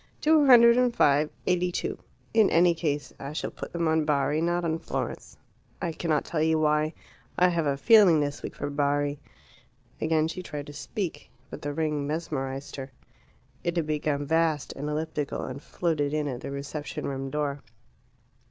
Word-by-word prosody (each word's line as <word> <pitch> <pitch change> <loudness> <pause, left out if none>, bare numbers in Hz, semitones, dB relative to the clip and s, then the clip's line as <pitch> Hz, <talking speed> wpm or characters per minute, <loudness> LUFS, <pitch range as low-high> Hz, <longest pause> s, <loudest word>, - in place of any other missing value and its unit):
"Two 305 -2 +4
hundred 235 -2 +8
and 250 -1 +2
five 145 -3 +4 0.2
eighty 180 0 +1
two. - - -3 0.3
In 220 -2 +5
any 170 +1 +5
case 150 -3 -2
I 140 +2 -6
shall 155 - -3
put - - -8
them 170 -1 -1
on 160 0 +2
Bari, 145 0 +1
not 175 +1 0
on 160 0 -1
Florence. - - -5 0.4
I 175 -3 -2
cannot 155 -2 -1
tell 155 - -2
you 160 0 +3
why; 155 0 +1 0.4
I 180 0 +5
have 165 -3 0
a 140 -1 0
feeling 200 -3 +6
this 145 -1 -2
week - - -6
for 145 0 -4
Bari." 145 0 0 0.8
Again 155 0 +2
she 175 +3 -5
tried 150 -5 -6
to 145 - -10
speak. 155 - -5 0.2
But - - -7
the 145 - -3
ring 150 -1 -1
mesmerized 140 -4 -4
her. 135 0 -7 0.7
It 170 0 -1
had 165 - +1
become 150 -1 -1
vast 160 -1 +1
and 145 +2 -5
elliptical, 150 -1 -3
and 130 +2 -6
floated 155 -3 -1
in 150 -1 0
at 125 -2 -4
the 140 - -6
reception 140 +2 -5
room 135 -1 -3
door. 145 -1 -2
155 Hz, 180 wpm, -27 LUFS, 145-170 Hz, 0.8 s, hundred